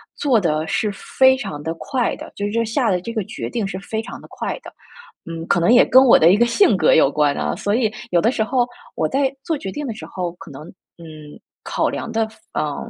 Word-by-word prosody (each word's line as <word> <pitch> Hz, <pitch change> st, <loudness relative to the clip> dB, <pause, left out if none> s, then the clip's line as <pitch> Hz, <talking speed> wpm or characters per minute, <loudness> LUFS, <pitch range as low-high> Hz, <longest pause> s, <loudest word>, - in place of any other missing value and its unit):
做 260 Hz, -6 st, +2 dB
得 155 Hz, -4 st, 0 dB
是 210 Hz, +6 st, -1 dB
非 260 Hz, +6 st, +3 dB
常 195 Hz, -, -6 dB
地 160 Hz, +2 st, -3 dB
快 250 Hz, -, -2 dB
的， -, -, -10 dB
就 205 Hz, -, -2 dB
是 205 Hz, -, -2 dB
这 230 Hz, 0 st, +1 dB
下 230 Hz, +2 st, 0 dB
的 180 Hz, -2 st, 0 dB
这 230 Hz, -, -6 dB
个 225 Hz, -2 st, -2 dB
决 220 Hz, -, -6 dB
定 225 Hz, -5 st, -2 dB
是 190 Hz, -, -5 dB
非 220 Hz, +3 st, -4 dB
常 -, -, -9 dB
地 -, -, -14 dB
快 -, -, -4 dB
的。 -, -, -10 dB, 0.6 s
嗯， 165 Hz, 0 st, -6 dB
可 -, -, +2 dB
能 170 Hz, +7 st, +3 dB
也 245 Hz, -, +7 dB
跟 260 Hz, +1 st, +6 dB
我 255 Hz, -, +7 dB
的 165 Hz, +2 st, +6 dB
一 -, -, +5 dB
个 235 Hz, -, +3 dB
性 290 Hz, -, +4 dB
格 175 Hz, -4 st, +4 dB
有 140 Hz, -3 st, +4 dB
关 145 Hz, -1 st, +1 dB
啊， 75 Hz, +1 st, -2 dB
所 205 Hz, +1 st, -1 dB
以 225 Hz, -3 st, 0 dB, 0.2 s
有 175 Hz, -, +3 dB
的 225 Hz, +7 st, +2 dB
时 225 Hz, -, 0 dB
候 245 Hz, +2 st, +1 dB, 0.3 s
我 155 Hz, -, 0 dB
在 270 Hz, -, 0 dB
做 325 Hz, -, -1 dB
决 195 Hz, -10 st, -6 dB
定 295 Hz, +8 st, -5 dB
的 240 Hz, -, -4 dB
时 215 Hz, -, -11 dB
候， 180 Hz, -2 st, -4 dB
可 -, -, -11 dB
能， 140 Hz, +1 st, -10 dB, 0.3 s
嗯， 155 Hz, -3 st, -12 dB, 0.2 s
考 -, -, -1 dB
量 230 Hz, -, -5 dB
的 225 Hz, -1 st, 0 dB
范 220 Hz, -, -21 dB
嗯， 150 Hz, -2 st, -3 dB
210 Hz, 275 characters per minute, -20 LUFS, 165-240 Hz, 0.6 s, 也